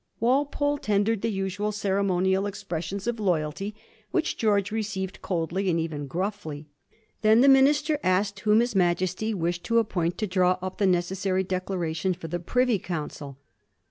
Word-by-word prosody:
Walpole 285 +4 +1
tendered 205 -1 +1
the 230 - 0
usual 200 +1 -2
cere 200 -1 0
monial 190 +1 +1
expressions 195 -1 -5
of 235 -1 -2
loyalty, 185 +1 -1 0.3
which 345 -3 0
G^rge 210 -2 +1
received 200 -3 -3
coldly, 180 +2 -1
and 165 -1 +1
even 155 -3 -3
gruffly. 165 -2 -4 0.6
Then 220 +2 +5
the 275 - +6
minister 290 +3 +4
asked 195 +1 +1
whom 210 +3 +4
his 240 -1 -1
Majesty 185 +4 +1
wished 175 -1 -2
to 230 - +2
appoint 175 -6 0
to 215 - -1
draw 185 -1 +2
up 185 +2 -6
the 200 - +3
necessary 185 +1 +1
declaration 185 -1 -2
for 165 -1 -8
the 175 +2 -2
Privy 245 +4 +1
Council. 150 -5 -6
195 Hz, 155 wpm, -26 LUFS, 175-215 Hz, 0.6 s, the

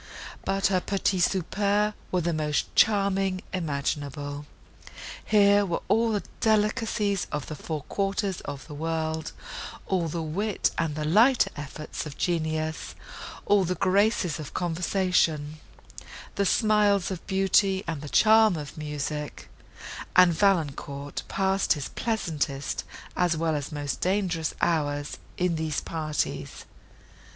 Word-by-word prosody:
But 195 0 0
her 185 - +3
petits 190 -2 +1
soupers 205 +3 0 0.2
were 180 - +1
the 170 0 0
most 150 -1 -1
charming 195 -3 +3
imaginable! 145 -3 -3 0.8
Here 205 -1 +5
were 175 -4 -2
all 225 +1 +3
the 205 - -1 0.2
delicacies 215 -2 +1
of 150 -2 -3
the - - -6
four 150 0 -5
quarters 195 +2 -1
of 140 -2 -7
the 150 - -10
world, 160 +1 -2 0.5
all 180 -3 0
the 165 +1 -3
wit 195 +7 0
and 160 -3 0
the 155 0 -2
lighter 230 - +4
efforts 150 +1 -6
of 145 - -9
genius, 160 -2 -2 0.5
all 205 -1 +4
the 180 0 -1
graces 195 -3 +2
of 150 - -8
conversation—the 175 0 -2
smiles 205 -3 +3
of 185 - -6
beauty, 195 0 +3
and 160 -4 -4
the 150 - -7
charm 220 0 +5
of 150 -1 -7
music; 150 0 -4 0.7
and 180 -1 +7
Valancourt 145 -6 0
passed 195 0 +2
his 145 -4 -5
pleasantest, 155 -11 -2 0.3
as 175 -2 +2
well 160 -1 0
as 145 +1 -4
most 145 -2 -3
dangerous 180 -4 0
hours 145 -3 0 0.2
in 180 -2 +1
these 155 -2 -1
parties. 155 -2 -3
175 Hz, 125 wpm, -27 LUFS, 150-200 Hz, 0.8 s, and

